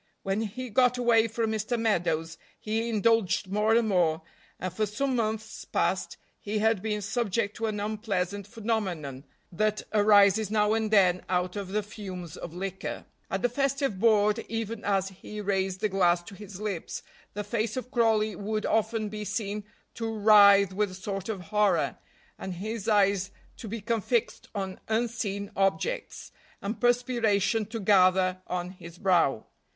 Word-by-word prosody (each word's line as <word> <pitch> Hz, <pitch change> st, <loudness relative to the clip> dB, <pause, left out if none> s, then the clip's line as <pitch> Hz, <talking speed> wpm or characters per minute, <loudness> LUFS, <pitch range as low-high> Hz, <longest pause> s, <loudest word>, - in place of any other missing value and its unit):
When 195 Hz, +2 st, -1 dB
he 235 Hz, +3 st, -5 dB
got 250 Hz, +2 st, +3 dB
away 235 Hz, -2 st, +4 dB
from 225 Hz, 0 st, -1 dB
Mr. 220 Hz, +2 st, -1 dB
Meadows 165 Hz, -7 st, 0 dB, 0.2 s
he 225 Hz, +2 st, -2 dB
indulged 215 Hz, -3 st, +2 dB
more 210 Hz, +2 st, +3 dB
and 230 Hz, -1 st, +3 dB
more, 165 Hz, -5 st, +2 dB, 0.4 s
and 185 Hz, -1 st, -4 dB
for 215 Hz, +2 st, 0 dB
some 265 Hz, +6 st, -1 dB
months 220 Hz, -1 st, -2 dB
past -, -, -1 dB, 0.2 s
he 210 Hz, +1 st, -3 dB
had 220 Hz, -2 st, +2 dB
been 210 Hz, -1 st, -2 dB
subject 210 Hz, -1 st, -1 dB
to 225 Hz, -1 st, -1 dB
an 210 Hz, -1 st, -2 dB
unpleasant 205 Hz, -2 st, -2 dB
phenomenon 190 Hz, -, -3 dB, 0.3 s
that 215 Hz, +4 st, 0 dB
arises 205 Hz, 0 st, +5 dB
now 210 Hz, 0 st, +2 dB
and 220 Hz, -1 st, 0 dB
then 185 Hz, -4 st, +4 dB
out 180 Hz, 0 st, 0 dB
of 200 Hz, -2 st, -4 dB
the 210 Hz, +3 st, -1 dB
fumes 185 Hz, -5 st, -8 dB
of 170 Hz, -, -7 dB
liquor. 190 Hz, +2 st, -5 dB, 0.2 s
At 195 Hz, -, -2 dB
the 245 Hz, -, +3 dB
festive 275 Hz, -4 st, -1 dB
board, 210 Hz, 0 st, +4 dB
even 225 Hz, -1 st, -4 dB
as 195 Hz, -1 st, +1 dB
he 200 Hz, +2 st, -9 dB
raised 190 Hz, -2 st, -1 dB
the 215 Hz, -, +1 dB
glass 175 Hz, -3 st, +2 dB
to 185 Hz, -, -11 dB
his 200 Hz, -1 st, -10 dB
lips, 205 Hz, -6 st, -4 dB, 0.3 s
the 210 Hz, -, -2 dB
face 220 Hz, +2 st, -2 dB
of 255 Hz, 0 st, -5 dB
Crawley 220 Hz, -4 st, +2 dB
would 215 Hz, +3 st, -3 dB
often 220 Hz, 0 st, 0 dB
be 210 Hz, 0 st, -5 dB
seen 210 Hz, -1 st, -3 dB, 0.3 s
to 225 Hz, -1 st, -3 dB
writhe 200 Hz, -2 st, +6 dB
with 205 Hz, +1 st, 0 dB
a 185 Hz, -, -9 dB
sort 195 Hz, +1 st, -5 dB
of 205 Hz, -4 st, -3 dB
horror, 210 Hz, +2 st, +1 dB, 0.4 s
and 190 Hz, -1 st, -5 dB
his 215 Hz, +4 st, -4 dB
eyes 200 Hz, -2 st, +3 dB, 0.3 s
to 230 Hz, -, -8 dB
become 225 Hz, +1 st, -2 dB
fixed 235 Hz, +1 st, -1 dB
on 190 Hz, -2 st, -4 dB
unseen 220 Hz, -3 st, -2 dB
objects, 460 Hz, -, -1 dB, 0.3 s
and 205 Hz, +3 st, -5 dB
perspiration 235 Hz, -4 st, +2 dB
to 225 Hz, +1 st, -5 dB
gather 185 Hz, -2 st, +4 dB
on 180 Hz, 0 st, -3 dB
his 170 Hz, -2 st, -12 dB
brow. 175 Hz, -, +2 dB
210 Hz, 160 wpm, -28 LUFS, 190-225 Hz, 0.4 s, writhe